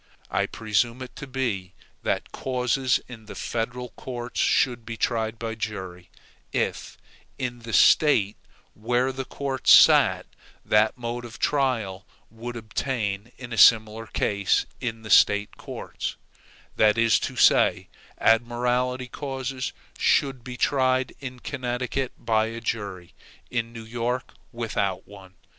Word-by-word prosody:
I - - +1
presume 115 +3 -1
it 130 - -11
to 140 - -7
be, 115 -9 -3 0.3
that - - -2
causes 130 0 0
in 110 -3 -11
the - - -9
federal 125 +2 -3
courts 120 0 -6
should 120 -3 +2
be 115 0 -7
tried 110 -1 -1
by 115 0 -4
jury, 95 -6 -6 0.4
if, - - -2 0.4
in 120 -1 -4
the 115 0 -8
State 110 -5 +5 0.4
where 120 +4 0
the 130 0 -5
courts 135 -2 0
sat, - - +7 0.4
that 110 +3 +3
mode 120 0 -4
of 115 -2 -9
trial 115 -9 0 0.2
would 120 +2 -7
obtain 110 -1 -3
in 125 -2 -8
a 115 - -1
similar 110 0 +5
case 100 -2 +1
in 115 -2 -4
the 110 - -6
State 105 0 +5
courts; - - -6 0.6
that 105 0 +4
is 115 -1 +4
to - - -4
say, - - +4 0.3
admiralty 125 +2 +1
causes 130 -1 -4 0.3
should 135 -3 +2
be 125 0 -7
tried 130 -2 +1
in 130 -3 -8
Connecticut 125 0 -3
by 110 -1 +1
a 115 +1 -6
jury, 100 -6 -4 0.4
in 115 -1 -2
New 115 -1 -9
York 120 +2 -3 0.2
without 100 -5 -2
one. 95 -2 -14
120 Hz, 135 wpm, -25 LUFS, 110-125 Hz, 0.6 s, sat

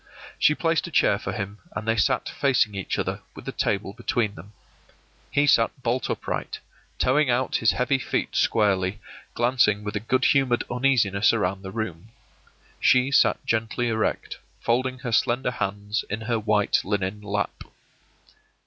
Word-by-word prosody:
She - - +4
placed - - 0
a - - -7
chair - - +3
for - - -4
him, 100 +2 -5 0.2
and 110 - -5
they 115 - +2
sat 100 - +1
facing 130 -7 +1
each 95 -2 -3
other, - - -2
with - - -11
the - - -3
table 100 -1 -1
between 115 -2 -1
them. 100 +5 -13 0.8
He 145 - +2
sat 130 -1 +2
bolt 120 0 -1
upright, - - -3 0.4
toeing 135 +2 +2
out 125 +2 +1
his 110 - +3
heavy 130 +2 +1
feet - - -2
squarely, 100 -2 +1 0.4
glancing 120 -4 +2
with 105 +1 -5
a - - 0
good 130 +4 0
humored 135 -4 +3
uneasiness 120 -6 +2
around 95 -3 -1
the 95 - -7
room. 110 -3 -5 0.7
She 130 +2 +4
sat 140 - +3
gently 115 +2 0
erect, 110 -1 -2 0.2
folding 130 +2 0
her 130 -2 -5
slender 120 +3 +1
hands 105 -1 -3
in 105 +2 -3
her 115 0 -1
white 105 -1 +2
linen 100 +1 -2
lap. 105 -1 -3
110 Hz, 160 wpm, -25 LUFS, 105-125 Hz, 0.8 s, She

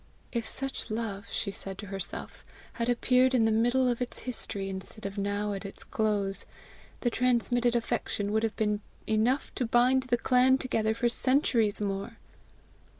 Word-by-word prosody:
"If 230 -2 -1
such 270 -1 -3
love," 215 -3 -3
she 200 - -2
said 195 -1 -6
to 205 - -7
herself, 195 -2 -5 0.3
"had 235 +1 -1
appeared 255 +2 +3
in 230 -3 +4
the 225 - +3
middle 245 +4 +3
of 245 0 0
its 250 - -3
history 205 -5 -4
instead 195 +2 -6
of 200 +1 -4
now 205 +1 -1
at 195 - -5
its 200 - -5
close, 205 -3 0 0.6
the 240 - +1
transmitted 245 0 +2
affection 230 -3 -1
would 220 +1 +2
have 225 -1 -1
been 210 -1 0 0.2
enough 225 +6 +1
to 250 - -1
bind 250 +3 +4
the 240 - +3
clan 255 +2 +4
together 220 -4 0
for 240 +1 +1
centuries 235 -4 +2
more!" 200 +2 -3
225 Hz, 165 wpm, -29 LUFS, 205-245 Hz, 0.6 s, in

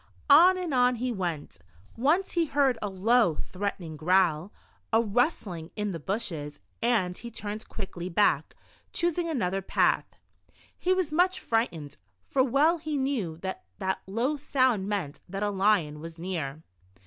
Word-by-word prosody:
On 355 +6 +8
and 355 -5 -3
on 250 0 +4
he 250 +2 -2
went 170 - -4 0.4
Once 305 +11 +2
he 335 -2 +1
heard 275 -5 +2
a 205 - -2
low, 195 -1 +3
threatening 180 -2 -4
growl, 175 +1 +2 0.4
a 225 - +5
rustling 215 - 0
in 210 -1 -2
the 165 - -5
bushes, 160 -6 -4 0.2
and 215 -7 +1
he 235 - -8
turned 215 -1 -6
quickly 185 -3 -6
back, 205 +4 +2 0.4
choosing 345 0 0
another 195 - -1
path. 190 - +2 0.7
He 365 - -1
was 370 -4 +1
much 365 +4 +2
frightened, 170 - -2 0.3
for 270 - +2
\ve\\ 295 +6 +2
he 310 -2 -2
knew 250 - -1
that 190 0 -4
that 190 0 -2
low 240 +9 0
sound 255 -8 +1
meant 190 -8 -3
that 195 +2 -3
a 205 - 0
lion 190 -7 +2
was 165 +1 -9
near. 160 -4 -4
210 Hz, 150 wpm, -28 LUFS, 180-270 Hz, 0.7 s, On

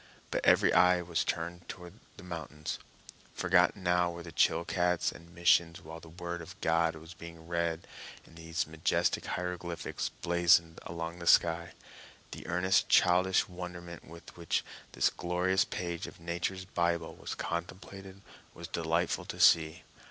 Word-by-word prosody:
But - - -1
every - - +5
eye 90 -1 +5
was 85 -2 0
turned 85 +1 -4
to 90 -1 -8 0.2
the 95 - -11
mountains. 80 -3 -6 0.6
Forgotten 95 +1 +3
now 90 0 +2
were 85 0 -7
the 85 - -9
Chilcats 85 +2 +1
and 85 0 -14
missions 85 -1 +3
while 80 +1 -9
the 80 - -14
word 85 +1 -6
of 80 - -11
God 80 0 +2
was 80 +2 -11
being 85 -1 -11
read 85 -1 -1 0.4
in - - -18
these 80 0 -3
majestic 80 0 0
hieroglyphics 90 -1 -3
blazoned 85 -1 +3
along 85 +1 -5
the 85 - -7
sky. 85 0 +4 0.6
The - - -8
earnest, 90 +2 +2
childish 90 +1 +4
wonderment 90 -1 -8
with 85 +1 -13
which 85 -2 -1 0.3
this - - +2
glorious 90 +2 +1
page 85 -2 -4
of - - -12
Nature's 85 +3 -3
Bible 85 -2 -1
was - - -6
contemplated 95 +3 -6 0.3
was 85 0 -8
delightful 85 +1 -1
to - - -7
see. 80 -1 +5
85 Hz, 145 wpm, -31 LUFS, 85-90 Hz, 0.6 s, every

